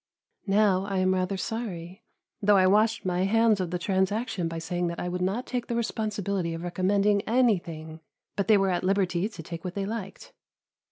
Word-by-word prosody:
Now 195 -1 +3
I 195 -1 -2
am 185 0 +3
rather 185 +1 -1
sorry, 190 -3 -5 0.4
though 205 0 +5
I 185 - +5
washed 215 +3 +3
my 180 0 +1
hands 225 0 +3
of 180 -2 -2
the 180 - -2
transaction 190 +1 -1
by 165 0 -5
saying 175 +2 -2
that 170 0 -4
I - - -3
would 180 0 -3
not 195 +7 -1
take 245 -2 -3
the 235 - -2
responsibility 200 -6 -2
of 165 - -7
recommending 200 +3 +2
anything, 170 -10 0 0.4
but 200 - -1
they 215 -2 +6
were 195 -1 +2
at 175 - -1
liberty 190 0 +1
to 180 -7 -10
take 165 0 -7
what 180 -1 -5
they 200 -1 -2
liked. 220 - -6
195 Hz, 190 wpm, -27 LUFS, 180-210 Hz, 0.4 s, they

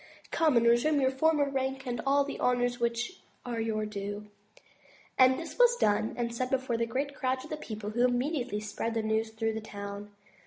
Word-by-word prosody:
Come 310 -6 +3
and 235 - +4
resume 240 +6 +4
your 260 -1 +3
former 295 +1 +2
rank 265 0 -2
and 240 -2 -3
all 280 +1 +4
the 280 - -6
honors 245 0 +1
which 235 +8 -2 0.2
are 240 -2 -3
your 215 -1 -1
due." 205 0 -6 0.9
All 255 0 +8
this 330 - -7
was 485 -1 +6
done 215 - +1
and 235 -1 -2
said 255 +2 -2
before 260 -2 0
great 275 +4 -2
crowds 260 -1 -2
of 305 -1 -6
people 215 -1 -5
who 240 +3 +1
immediately 250 -3 0
spread 220 +2 -3
the 225 - 0
news 220 +1 0
through 225 0 -2
the 220 - -4
town. 200 -1 -7
245 Hz, 190 wpm, -30 LUFS, 220-265 Hz, 0.9 s, All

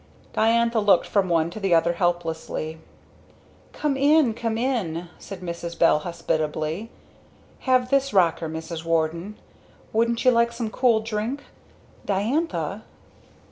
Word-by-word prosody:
Diantha 230 +1 +3
looked 205 -2 +4
from 195 -3 +1
one 165 -1 +2
to 215 - -7
the 195 -4 +2
other 165 +1 +3
helplessly. 165 -2 -2 0.9
"Come 295 -2 -1
in! 285 -2 +4
Come 230 -1 -2
in!" 190 -10 -2
said 195 -2 -9
Mrs. 170 -1 -5
Bell 165 -2 +4
hospitably. 160 +3 -2 0.8
"Have 255 0 +3
this 275 0 +2
rocker, 170 -4 +2
Mrs. 160 +1 -6
Warden 165 +4 -1 0.6
wouldn't 230 +2 +1
you 255 - +7
like 235 0 +2
some 230 -2 -4
cool 235 -3 +3
drink? 220 +5 -3 0.6
Diantha?" 230 - -1
200 Hz, 125 wpm, -24 LUFS, 170-235 Hz, 0.9 s, you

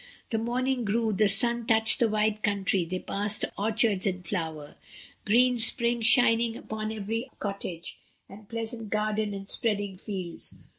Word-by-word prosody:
The 225 - +1
morning 250 +2 0
grew, 220 +1 +1
the 210 +2 +3
sunrise 235 +4 +1
touched 220 0 +4
the 235 - +3
wide 215 0 +1
country, 200 -3 +1
they 185 +2 -3
passed 205 +3 -1
orchards 215 -1 +1
in 185 -1 -2
flower, 160 -5 -4 0.5
green 245 +3 +4
spring 235 +1 +2
shining 230 -1 +4
upon 215 0 -4
every 220 +4 -3
cottage, 195 -4 -5 0.3
and 200 +1 -13
pleasant 225 -1 -5
garden 215 -1 0
and 195 0 -7
spreading 205 -4 -1
fields. 185 -5 -4
215 Hz, 145 wpm, -28 LUFS, 200-230 Hz, 0.5 s, touched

